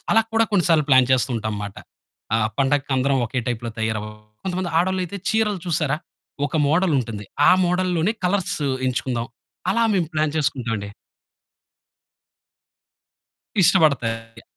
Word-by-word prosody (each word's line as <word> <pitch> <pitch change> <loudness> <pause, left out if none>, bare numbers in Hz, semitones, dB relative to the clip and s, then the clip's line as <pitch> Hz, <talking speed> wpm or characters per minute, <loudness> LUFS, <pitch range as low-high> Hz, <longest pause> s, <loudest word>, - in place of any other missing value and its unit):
అలా 225 - +6
కూడా 225 0 +4
కొన్నిసార్లు 165 -5 +3
ప్లాన్ 130 -1 +6
చేస్తూ 130 0 +2
ఉంటాంమాట. 105 -2 -4 0.6
ఆ - - +5 0.2
పండగకి 140 0 +1
అందరం 135 +1 +2
ఓకె 125 +2 -2
టైప్‌లో 120 -1 -3
తయారవ్వడం, 105 -1 -3 0.2
కొంతమంది 185 -1 -2
ఆడోళ్లైతే 185 +1 -1
చీరలు 215 -4 +1
చూసారా! 150 -3 +1 0.5
ఒక 160 - -3
మోడల్ 170 +2 +2
ఉంటుంది. 110 -4 -4 0.2
ఆ - - +8
మోడల్ 180 +1 +1
లోనే 175 +7 +1
కలర్స్ 180 -2 0 0.3
ఎంచుకుందాం. 125 -2 -1 0.5
అలా 230 +4 +2
మేము 175 -4 +1
ప్లాన్ 155 -1 0
చేసుకుంటాం 130 -6 -1
అండి. 100 0 -6 2.7
ఇష్టపడతాయి. 120 - +2
145 Hz, 125 wpm, -22 LUFS, 115-180 Hz, 2.7 s, ఆ